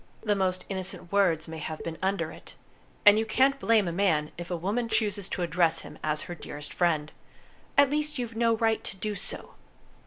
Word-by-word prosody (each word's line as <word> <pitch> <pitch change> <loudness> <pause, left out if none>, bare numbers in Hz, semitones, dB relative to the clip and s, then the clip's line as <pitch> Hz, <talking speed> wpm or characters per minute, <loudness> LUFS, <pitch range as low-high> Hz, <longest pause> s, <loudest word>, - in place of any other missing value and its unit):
"The 210 - +2
most 185 -2 0
innocent 190 -2 -4
words 175 -6 +2
may 160 0 -6
have 155 +1 -5
been 160 -1 -5
under 195 +1 0
it. - - -13 0.5
And 205 +1 +8
you 220 - 0
can't 270 +4 +3
blame 225 -6 +3
a - - -1
man 165 -5 +1
if 175 0 -7
a 175 - -1
woman 215 +7 -1
chooses 210 -3 0
to 180 - -2
address 165 -1 +2
him - - -11
as 150 0 0
her 175 - -6
'dearest 150 -3 -6
friend'. 155 -4 +1 0.7
At 280 -1 +6
least 300 0 0
you've 235 -2 -4
no 230 0 +3
right 225 0 +1
to 195 - -6
do 210 +2 -3
so." - - -5
195 Hz, 205 wpm, -28 LUFS, 170-225 Hz, 0.7 s, And